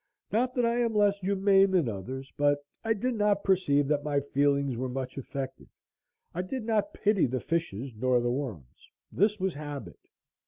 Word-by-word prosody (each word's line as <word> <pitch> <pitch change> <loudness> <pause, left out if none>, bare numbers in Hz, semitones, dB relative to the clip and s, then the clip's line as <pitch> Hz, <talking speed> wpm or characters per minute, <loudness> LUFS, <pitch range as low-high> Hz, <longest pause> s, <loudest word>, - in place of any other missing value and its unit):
Not 250 +3 +1
that 245 -2 +2
I 235 +1 +1
am 230 -2 +1
less 205 -1 +3
humane 195 0 +4
than 180 -7 +2
others, 130 +6 -6
but 145 0 +2 0.2
I 225 0 +1
did 250 +5 -1
not 210 -2 +1
perceive 145 -7 +2
that 145 -1 +1
my 145 -1 +1
feelings 140 -1 +1
were 130 +2 -3
much 130 0 -4
affected. 135 0 -6 0.7
I 180 - -1
did 225 +7 -4
not 225 +6 0
pity 205 -6 +2
the 130 +1 -2
fishes 135 -7 -3
nor 125 +2 +2
the 120 0 0
worms. 110 - -6 0.2
This 205 +3 +2
was 190 -1 0
habit. 145 - -7
145 Hz, 180 wpm, -29 LUFS, 130-205 Hz, 0.7 s, humane